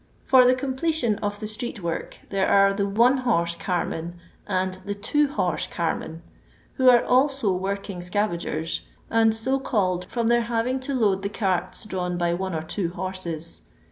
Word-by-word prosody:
For 260 -1 +6
the 255 - +5
completion 260 -3 0
of 205 0 -3
the 215 - -5
street 215 -1 -5
work 170 -1 -4
there 195 -1 +1
are 195 0 +5
the 200 0 0
one 235 +6 +4
horse 170 -10 +1
carmen 170 -1 -3 0.3
and 185 -1 -1
the 205 +1 -4
two 290 +9 +1
hor^ 190 -10 -1
carmen, 165 -1 -3 0.5
who 260 -2 +5
are 240 -1 +6
also 260 -4 +3
working 195 0 -3
scavagers, 175 -3 -1 0.3
and 225 -1 +4
so 260 +5 +1
called 185 -9 0
from 235 +4 -2
their 235 +1 +4
having 240 +3 0
to 265 +1 -3
load 200 -6 +2
the 200 - -2
carts 190 -3 -1
drawn 180 -3 -3
by 170 0 +1
one 190 0 -3
or 155 - -2
two 170 +2 -2
horses. 175 - -5
200 Hz, 170 wpm, -24 LUFS, 180-240 Hz, 0.5 s, For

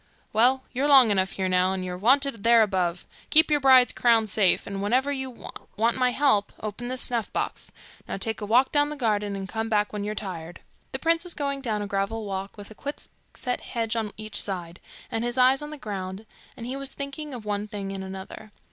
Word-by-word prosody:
'Well, 255 +4 +3
you're 270 +3 0
long 265 -6 +7
enough 190 -1 +1
here 190 -1 -1
now, 185 0 +2
and 185 -1 -3
you're 180 0 -4
wanted 255 +4 +2
there 230 -1 +6
above. 180 -4 -1 0.2
Keep 315 +1 +8
your 295 - +4
bride's 260 -2 +6
crowns 225 -3 +3
safe, 195 -4 +3
and 195 -1 -5
whenever 255 +7 +1
you 265 -2 -3 0.5
want 230 +2 +2
my 255 -1 +2
help, 250 -6 +2
open 215 +3 -6
this 255 0 -1
snuff 235 -3 -1
box. - - -4 0.4
Now - - -4
take 220 +3 -3
a 205 - -4
walk 245 +5 +4
down 290 0 +2
the 300 - -5
garden, 210 -6 -1
and 195 -1 -5
come 225 +2 -3
back 210 -1 +1
when 205 -1 -3
you're 210 +1 -3
tired.' 175 -5 -6 0.3
The - - -3
prince 330 0 +2
was 355 -2 -2
going 280 -1 -2
down 215 -5 -2
a - - -5
gravel 200 +3 -2
walk 195 +1 -5
with 205 +1 -10
a - - -8
quickset 255 -1 -6
hedge 230 -1 -3
on 220 -2 -2
each 215 0 -5
side, 180 -3 -5 0.3
and 225 - -2
his 240 +1 -2
eyes 260 +2 +4
on 295 - -6
the 300 - -7
ground, 195 -4 -6 0.3
and 230 - -7
he 255 +2 -4
was 275 0 -4
thinking 280 +2 -5
of 225 -3 -9
one 205 0 -2
thing 200 -2 -6
and 195 -1 -5
another. 190 +3 -9
220 Hz, 220 wpm, -25 LUFS, 200-260 Hz, 0.5 s, Keep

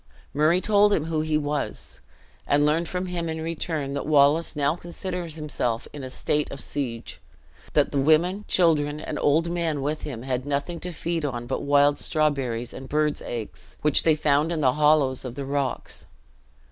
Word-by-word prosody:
Murray 155 +5 +3
told 205 0 +4
him 155 - +1
who 160 -1 -1
he 155 -1 +1
was; 145 -1 -3 0.5
and 145 +1 +3
learned 160 +3 +1
from 180 0 -2
him 175 -2 -3
in 160 0 -3
return, 160 -3 -3
that 140 - -3
Wallace 150 +2 +4
now 145 +1 +1
considered 175 -1 -5
himself 145 -6 -2
in 145 -2 -7
a 130 - -5
state 150 +3 -1
of 140 - -7
siege; 125 -6 -4 0.5
that - - +3
the 140 - 0
women, 170 +8 +3
children, 150 -4 +2
and - - -5
old 160 +4 +2
men 165 -4 -1
with 150 +2 -2
him, 120 -5 -6
had 130 -1 -2
nothing 145 +4 -2
to 180 - -5
feed 170 0 -3
on 120 -4 -3
but 130 - -3
wild 145 0 +3
strawberries 135 -7 -1
and 130 0 -9
birds' 150 0 0
eggs, 115 -3 -7
which 150 -2 +4
they 160 -2 +4
found 150 +1 +2
in 165 -2 -1
the 130 -3 +4
hollows 150 -3 +3
of 125 -2 -6
the 140 0 -4
rocks. 140 -1 -3
150 Hz, 185 wpm, -25 LUFS, 140-165 Hz, 0.5 s, told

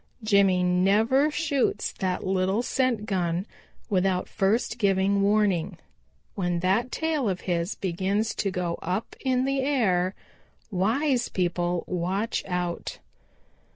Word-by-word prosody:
Jimmy 200 -4 +4
never 205 +10 +3
shoots 285 -8 0
that 185 -1 -3
little 190 +4 +1
scent 250 -5 0
gun 180 -3 -1 0.4
without 185 -2 +1
first 210 +5 0
giving 200 -1 +2
warning. 200 -4 +1 0.6
When 175 -3 -1
that 200 +7 +1
tail 310 -8 0
of 185 -1 -3
his 175 +1 -1
begins 195 +4 -1
to 200 - 0
go 180 -2 -3
up 185 +6 -3
in 260 -1 +1
the 275 0 0
air, 200 -10 +1 0.6
wise 240 +7 +1
people 175 -1 -1
watch 185 +5 -2
out. 180 -2 -3
195 Hz, 120 wpm, -26 LUFS, 180-225 Hz, 0.6 s, Jimmy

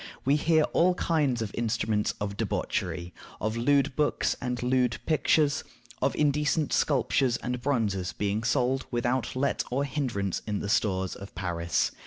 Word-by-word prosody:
We 140 +2 +4
hear 155 +1 +3
of - - -2
all 180 +2 +4
kinds 145 -10 +1
of 105 - -5
instruments 110 -2 0
of 100 -1 -3
debauchery; 90 -2 -2 0.3
of 110 +1 -1
lewd 135 +3 +2
books 150 -1 +1
and 125 -1 -2
lewd 125 -3 +2
pictures; 155 -2 +2 0.4
of - - +1
indecent 150 +1 +1
sculptures 130 -3 +2
and 125 +1 -4
bronzes 105 - 0
being 105 +5 -2
sold 125 +3 +1
without 120 +1 -1
let 140 +2 0
or 135 +3 0
hinderance 125 - -2
in 105 -1 -1
the 100 - -4
stores 95 -3 +1
of 100 0 -11
Paris. 85 -8 0
120 Hz, 155 wpm, -28 LUFS, 105-140 Hz, 0.4 s, We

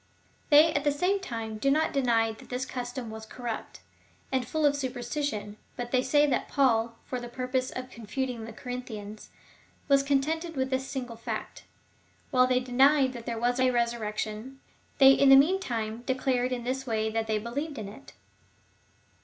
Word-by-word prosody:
They 305 +2 +7
at 285 - 0
the 290 - +3
same 360 +8 +1
time 225 - -5
do 275 - +2
not 310 +3 +2
deny 235 -4 +2
that 220 - -13
this 250 +1 -2
custom 245 -2 -5
was 220 0 -8
corrupt, 235 0 -6 0.5
and 260 -3 0
full 310 +2 0
of 285 -1 +4
superstition, 245 -4 -3 0.2
but 240 -1 -5
they 255 - +3
say 290 +3 +3
that 280 - 0
Paul, 230 -4 +2
for 255 - -4
the 240 0 -7
purpose 255 +1 -2
of 255 0 -7
con 230 -3 -11
futing 245 -1 -3
the - - -7
Corinthians, 220 -3 -7 0.6
was 275 -2 +5
contented 305 +4 0
with 265 0 -1
this 260 0 -1
single 250 -4 -5
fact,^ 230 - -5
that - - -21 0.7
while 255 -2 +5
they 255 0 +3
denied 265 +2 +4
that 235 -1 -9
there 235 -1 -2
was 245 +2 0
a 255 0 +4
resurrection, 235 +1 -2 0.4
they 270 -1 +9
in 275 0 +5
the 270 - +10
mean 320 +8 +5
time 225 - -3
declared 255 -1 0
in 245 -1 -2
this 265 +2 -3
way 220 -1 0
that 225 0 -1
they 215 -1 +1
believed 275 +8 -4
in 215 -3 -5
it. 215 +8 -12
255 Hz, 185 wpm, -28 LUFS, 230-275 Hz, 0.7 s, the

